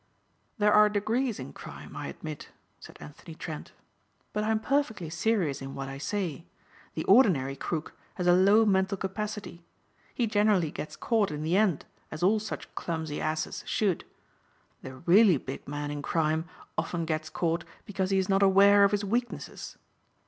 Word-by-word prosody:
"There 210 -1 +3
are 210 0 +7
degrees 220 +3 -1
in 70 - -7
crime - - -10
I - - -5
admit," - - -8 0.3
said - - -13
Anthony 155 +2 -11
Trent, 155 -2 -7 0.6
"but 210 - -1
I 215 - -1
am 220 0 +2
perfectly 220 - -1
serious 165 -6 0
in 135 0 -7
what 135 0 -5
I 135 0 -7
say. 170 0 -3 0.5
The - - -2
ordinary 140 - +4
crook 155 +3 -4 0.2
has 180 - -3
a 175 - +6
low 200 +5 +5
mental 195 -1 +2
capacity. 200 -2 -5 0.5
He 240 - +1
generally 205 -6 +2
gets 155 - -6
caught 220 -4 +1
in 150 0 -4
the 165 +3 +1
end 195 -6 +2 0.2
as 155 - -6
all 210 +4 +4
such 215 - -7
clumsy 160 -3 -4
asses 155 0 -2
should. 195 -6 0 0.8
The 130 0 -8
really 180 - +5
big 135 +1 -8
man 145 +1 -4
in 145 0 -4
crime 160 +1 0 0.3
often 170 -2 -2
gets 155 -1 -2
caught 170 0 -1 0.2
because 190 -2 -2
he 195 - +2
is 190 -1 +1
not 195 0 +2
aware 200 +1 +6
of 200 - +5
his 205 0 0
weaknesses. 240 +4 -3
185 Hz, 170 wpm, -28 LUFS, 155-210 Hz, 0.8 s, are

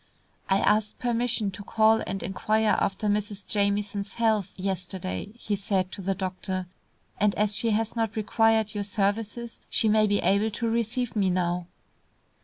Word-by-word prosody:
"I 195 - +4
asked 210 +1 +2
permission 235 -4 0
to 195 +2 -9
call 220 +2 +3
and 195 +1 -3
inquire 215 +3 +1
after 195 +2 -1
Mrs. 205 -1 -1
Jamieson's 200 0 -1
health, 220 -4 +1
yesterday," 185 - -3
he 210 -3 -2
said 190 -2 -1
to 195 - -6
the 195 +1 -1
doctor, 185 0 -3 0.5
"and 210 -1 +3
as 210 0 +3
she 230 - +1
has 225 +1 0
not 225 -2 -1
required 220 0 +2
your 205 -1 -2
services 215 +3 -2
she 225 - +2
may 215 0 +4
be 205 0 +2
able 200 +4 +2
to 230 +2 -3
receive 235 +1 -1
me 195 -3 +2
now." 175 -1 0
210 Hz, 160 wpm, -27 LUFS, 195-220 Hz, 0.5 s, I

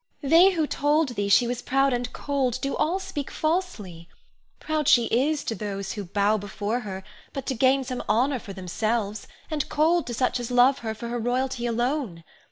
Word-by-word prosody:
Ione. 275 - -3
They 355 +4 +7
who 320 -2 +1
told 295 +1 +1
thee 205 -4 -2
she 200 +5 +5
was 245 0 -3
proud 270 +1 +2
and 245 0 -2
cold 270 -4 -1
do 275 - -2
all 345 +5 +1
speak 300 -7 -5
falsely. 225 - -3 0.5
Proud 310 -2 -2
she 240 -2 +6
is 285 +7 +1
to - - -2
those 200 -1 -4
who 205 -2 -5
bow 205 +3 +1
before 205 +3 -3
her 190 -5 -7 0.3
but 275 - -5
to - - -1
gain 265 +2 +3
some 255 -1 -4
honor 250 +5 +2
for 205 - -10
themselves, 205 +3 -2 0.2
and 300 -2 -2
cold 325 +3 +2
to 240 - -4
such 250 +1 0
as 240 0 -4
love 250 +2 +4
her 220 -1 -4
for 235 +2 -6
her 240 0 -2
royalty 245 +1 -1
alone. 240 - -2
245 Hz, 195 wpm, -25 LUFS, 215-280 Hz, 0.5 s, They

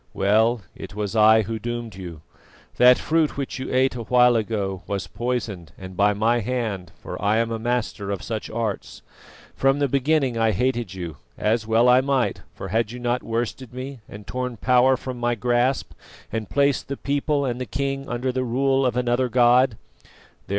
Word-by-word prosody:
Well, 110 +4 +3
it 100 - -9
was 105 0 -3
I 110 0 +6
who 110 +2 -4
doomed 120 -1 -4
you. 90 -4 -9 0.6
That 125 0 +7
fruit 160 -2 0
which 140 -1 -4
you 130 - -5
ate 130 +1 +2
a 125 - -5
while 125 +1 +4
ago 100 -4 -2
was 100 -2 -2
poisoned, 105 -7 -4
and 95 -1 -9
by 105 +2 +3
my 115 +3 +2
hand, 110 -6 -3
for - - -6
I 105 +2 +2
am 115 0 0
a 115 - -2
master 115 -4 -2
of 100 -2 -3
such 110 -2 -4
arts. 110 -3 -4 0.5
From 135 +1 +2
the 145 -1 +1
beginning 135 -2 +1
I 115 -1 +3
hated 120 -2 -1
you, 85 -5 -6 0.2
as 110 +1 0
well 115 +2 +4
I 125 +1 +6
might, 135 -2 0
for 95 - -7
had 110 +2 0
you 125 - -7
not 120 +1 -1
worsted 120 +2 -4
me 130 +1 -6
and 105 0 -10
torn 125 -2 -4
power 125 +3 +4
from 125 -1 -6
my 120 0 +1
grasp, 120 +3 0 0.4
and 110 -2 -4
placed 140 -1 +1
the 140 - -4
people 140 0 0
and 125 -1 -3
the 125 - -4
king 135 +3 -3
under 125 +2 -1
the 130 0 -1
rule 135 +2 +1
of 125 -1 -2
another 125 +1 +1
God? 120 -1 +4
120 Hz, 185 wpm, -23 LUFS, 110-130 Hz, 0.6 s, That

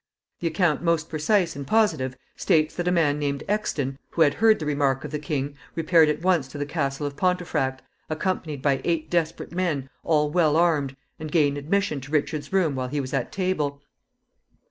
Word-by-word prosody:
The 170 - -1
account 165 -1 +1
most 165 -1 +1
precise 170 +3 +1
and 140 -1 -6
positive 155 - +1 0.2
states 155 -1 +2
that 175 0 -2
a - - +3
man 150 -4 +2
named 140 -1 -2
Exton, 145 -10 -1
who 165 - +3
had 145 - +3
heard 220 0 +4
the 155 - -5
remark 140 -3 +1
of 150 - -6
the 150 - -2
king, 145 -2 -3 0.2
repaired 165 -1 +4
at 150 +2 -2
once 175 -7 +2
to 140 - -9
the 145 - -2
castle 140 -2 -2
of 140 -1 -4
Pontefract, 170 -6 0 0.3
accompanied 155 -3 -2
by 135 -2 +2
eight 165 -2 -1
desperate 165 -2 -1
men, 160 -7 -2
all 150 -2 +2
well 155 -3 +3
armed, 150 -6 +2 0.2
and 155 -1 -6
gained 145 -3 +2
admission 155 -1 0
to 140 +3 -11
Richard's 155 +1 -1
room 185 -6 +2
while 130 -1 -2
he 145 +3 -2
was 130 -2 -4
at - - -1
table. 155 -7 -1
155 Hz, 190 wpm, -25 LUFS, 140-170 Hz, 0.3 s, heard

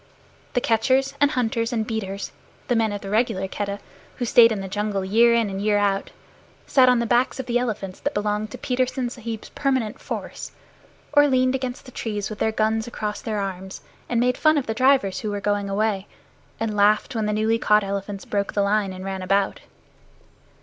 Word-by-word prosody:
The 245 - +1
catchers, 260 +5 +2
and 285 - +6
hunters, 235 -3 -1
and 225 -2 -1
beaters, 200 -3 -4 0.4
the 245 - +3
men 225 -2 +2
of 205 -1 -4
the 195 - -6
regular 210 -4 +1
Keddah, 200 +1 -4 0.4
who 245 - -2
stayed 230 0 +6
in 215 - -1
the 195 - -5
jungle 205 0 -2
year 230 +4 +5
in 230 -2 +2
and 195 0 -4
year 210 0 +2
out, 200 -1 0 0.6
sat 255 -2 +5
on 250 - +4
the 235 - 0
backs 245 +3 +1
of 265 - -3
the 245 0 +1
elephants 205 -6 -4
that 285 - -3
belonged 210 +1 -1
to 255 - -8
Petersen 255 0 -1
Sahib's 230 -3 -6
permanent 260 -6 -1
force, - - -6 0.6
or 290 0 +6
leaned 255 -1 +2
against 255 -1 -4
the 255 - -11
trees 210 -4 -4
with 215 - -7
their 220 - +1
guns 220 +1 0
across 210 -3 -4
their 215 -2 -3
arms, 190 -1 -5 0.3
and 240 - +1
made 250 +1 +2
fun 310 -1 +4
of 280 - 0
the 220 - -2
drivers 255 -5 +3
who 215 - -3
were 205 0 -2
going 205 0 -1
away, 200 -1 0 0.5
and 225 -2 -2
laughed 210 +3 +3
when 220 -3 -1
the - - 0
newly 220 +2 +1
caught 210 -1 +4
elephants 195 0 -4
broke 200 -1 -2
the 200 - +2
line 200 -1 +1
and 185 0 -8
ran 190 -1 -4
about. 195 +1 +1
220 Hz, 205 wpm, -23 LUFS, 200-245 Hz, 0.6 s, and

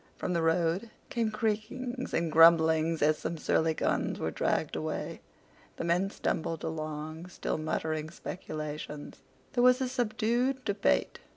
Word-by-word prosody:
From 180 - -2
the 170 - +1
road 165 +6 +1 0.2
came 230 -2 +1
creakings 230 +4 -2
and 165 -1 0
grumblings 160 0 +5
as 155 +1 +3
some 170 - -3
surly 160 +1 +1
guns - - 0
were - - -2
dragged - - 0
away. - - -4 0.5
The - - -4
men 175 +3 +2
stumbled 165 -4 -2
along 155 +1 -4
still 180 - -3
muttering 155 0 -2
speculations. 155 -3 -6 0.3
There 245 - +2
was 250 +1 +6
a 260 - 0
subdued 245 +2 0
debate. 200 0 +1
170 Hz, 135 wpm, -30 LUFS, 160-220 Hz, 0.5 s, was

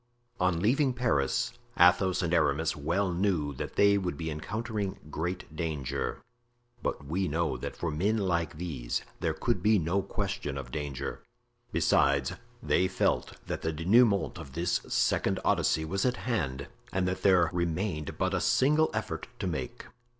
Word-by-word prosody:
On 90 -2 +2
leaving 130 - +2
Paris, 90 - +1 0.3
Athos 90 +1 +5
and 85 0 0
Aramis 80 -1 +2
well 85 +6 0
knew 85 -6 0
that 65 - -6
they 100 0 +5
would 90 -6 -3
be 80 +1 -3
encountering 105 +5 -3
great 85 0 -4
danger; 70 -5 -3 0.6
but 70 - -3
we 90 +6 -1
know 85 +2 0
that - - -5
for 85 - -2
men 100 +9 +1
like 85 -5 0
these 70 -9 -3 0.2
there - - -1
could - - 0
be 110 0 +4
no 90 +3 +1
question 100 - -3
of 65 -2 -7
danger. 70 -1 -4 0.5
Besides, 70 -2 +3 0.3
they 95 - +3
felt 95 - 0
that - - -4
the 80 - -1
dénouement 100 +5 +3
of 70 -5 -9
this 85 +2 0
second - - +1
Odyssey 80 +1 +2
was 95 +5 -1
at 125 -1 +1
hand 70 - -2 0.2
and 95 -1 0
that 90 - -2
there 90 -4 +4
remained 85 -2 -2
but - - 0
a - - +1
single 150 +4 +3
effort - - -3
to - - -4
make. - - -4
85 Hz, 155 wpm, -29 LUFS, 75-100 Hz, 0.6 s, Athos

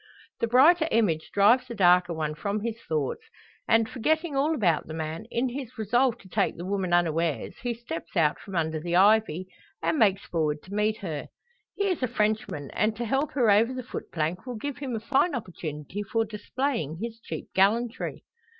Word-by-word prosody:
The 230 - +1
brighter 315 +8 +5
image 170 -9 +1
drives 235 +6 +4
the 235 - -6
darker 180 -2 +5
one 155 -2 -2
from 200 +6 -3
his 230 +1 -4
thoughts; 155 - -1 0.5
and, 225 -1 +4
forgetting 310 +6 0
all 295 +4 +2
about 175 - +1
the 155 - -6
man, 160 +5 -4
in 245 +2 0
his 255 -1 -7
resolve 240 +3 +2
to 190 - -15
take 195 +2 0
the 175 - -6
woman 190 -2 -1
unawares, 165 -3 0
he 245 -1 -2
steps 185 -7 -7
out 150 -3 +3
from 195 - -9
under 160 -1 0
the 170 +2 -2
ivy, 195 -3 +4 0.3
and 310 - 0
makes 200 -3 +3
forward 155 -3 -1
to 190 - -11
meet 210 +1 +1
her. 160 -7 -4 0.5
He 400 - -1
is 370 -6 0
a 255 - +2
Frenchman, 215 - -1
and 215 +1 +1
to 235 +2 -3
help 270 +6 0
her 240 -6 +4
over 230 +5 +3
the 255 - -4
footplank 175 -2 -4
will 250 - -4
give 285 +5 -5
him 265 -4 -3
a - - -2
fine 280 +7 +1
opportunity 175 -4 -5
for 225 +3 0
displaying 215 - -3
his 230 +1 -5
cheap - - -7
gallantry. 225 +5 +1
215 Hz, 190 wpm, -27 LUFS, 175-245 Hz, 0.5 s, brighter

